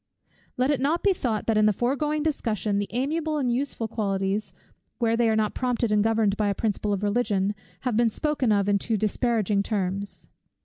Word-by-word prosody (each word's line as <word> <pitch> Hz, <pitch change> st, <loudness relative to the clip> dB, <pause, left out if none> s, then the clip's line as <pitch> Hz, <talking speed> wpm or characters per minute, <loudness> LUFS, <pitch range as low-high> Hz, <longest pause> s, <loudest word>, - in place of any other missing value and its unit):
Let 255 Hz, +3 st, +2 dB
it 285 Hz, -, 0 dB
not 310 Hz, +5 st, +1 dB
be 400 Hz, -, +4 dB
thought 230 Hz, -, -2 dB
that 220 Hz, -2 st, +2 dB
in 215 Hz, -, +5 dB
the -, -, +5 dB
foregoing 285 Hz, +7 st, 0 dB
discussion, 215 Hz, -, -1 dB
the 205 Hz, -, -2 dB
amiable 305 Hz, +6 st, -1 dB
and 255 Hz, -4 st, 0 dB
useful 250 Hz, -3 st, -2 dB
qualities, 200 Hz, -1 st, -1 dB, 0.5 s
where 230 Hz, -1 st, +1 dB
they 230 Hz, -1 st, +2 dB
are 220 Hz, -, +2 dB
not 215 Hz, -1 st, +1 dB
prompted 245 Hz, -3 st, -1 dB
and 210 Hz, -1 st, +3 dB
governed 220 Hz, -2 st, +2 dB
by 210 Hz, -, +1 dB
a 200 Hz, -, 0 dB
principle 210 Hz, -1 st, -1 dB
of 200 Hz, 0 st, -1 dB
religion, 205 Hz, -2 st, +1 dB, 0.3 s
have 250 Hz, -4 st, -1 dB
been 235 Hz, +1 st, +3 dB
spoken 280 Hz, -1 st, 0 dB
of 200 Hz, -1 st, +2 dB
in 200 Hz, -1 st, +3 dB
too 220 Hz, +2 st, -1 dB
disparaging 215 Hz, -1 st, +1 dB
terms. 200 Hz, -1 st, -3 dB
220 Hz, 195 wpm, -25 LUFS, 205-250 Hz, 0.5 s, in